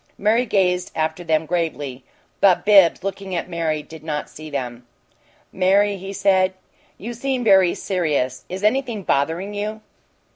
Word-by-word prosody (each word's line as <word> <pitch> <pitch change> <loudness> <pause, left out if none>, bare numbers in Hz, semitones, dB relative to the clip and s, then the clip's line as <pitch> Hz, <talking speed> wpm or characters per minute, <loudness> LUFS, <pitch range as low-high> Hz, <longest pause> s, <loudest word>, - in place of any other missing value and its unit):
Mary 225 +4 +2
gazed 180 -3 +1
after 160 +2 -2
them 160 -1 +1
gravely, 150 -6 -3 0.4
but 190 -3 +4
Bibbs, 195 -4 +5
looking 195 -1 -4
at 170 - -2
Mary, 160 -3 -2
did 160 0 -12
not 150 -2 -4
see 155 0 -10
them. 125 -4 -5 0.7
"Mary," 200 +2 +3
he 195 +1 -7
said, 190 -1 +2 0.4
"you 235 +4 -6
seem 260 +1 -2
very 190 -5 +5
serious. 150 -9 -1
Is 190 +2 -6
anything 235 -2 0
bothering 165 +8 0
you?" 210 +1 -4
185 Hz, 145 wpm, -21 LUFS, 160-205 Hz, 0.7 s, Bibbs